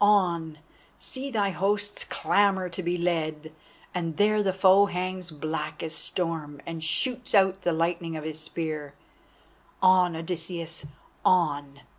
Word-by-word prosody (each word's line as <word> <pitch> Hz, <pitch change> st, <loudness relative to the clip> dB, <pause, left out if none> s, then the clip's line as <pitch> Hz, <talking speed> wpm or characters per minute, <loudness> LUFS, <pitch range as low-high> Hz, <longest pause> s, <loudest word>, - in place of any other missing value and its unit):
On! 170 Hz, -6 st, +3 dB, 0.4 s
see 270 Hz, +1 st, -6 dB
thy 205 Hz, -6 st, +1 dB
hosts 205 Hz, +2 st, -1 dB
clamour 195 Hz, -2 st, +2 dB
to 170 Hz, +2 st, -5 dB
be 175 Hz, 0 st, -1 dB
led, 160 Hz, -3 st, -1 dB, 0.4 s
and 165 Hz, -3 st, -3 dB
there 210 Hz, +1 st, +4 dB
the 195 Hz, -2 st, +2 dB
foe 190 Hz, +1 st, +6 dB
hangs 185 Hz, -1 st, -3 dB
black 155 Hz, 0 st, -4 dB
as 160 Hz, -1 st, -2 dB
storm 160 Hz, -5 st, -3 dB
and 165 Hz, -1 st, -5 dB
shoots 245 Hz, +9 st, -1 dB
out 190 Hz, -1 st, +4 dB
the 175 Hz, -, +1 dB
lightning 165 Hz, 0 st, -1 dB
of 155 Hz, -, -6 dB
his 155 Hz, 0 st, -4 dB
spears. 155 Hz, -3 st, -4 dB, 0.9 s
On, 185 Hz, -2 st, +5 dB
Odysseus, 165 Hz, -1 st, -4 dB, 0.4 s
on! 145 Hz, -5 st, +2 dB
175 Hz, 135 wpm, -27 LUFS, 160-190 Hz, 0.9 s, foe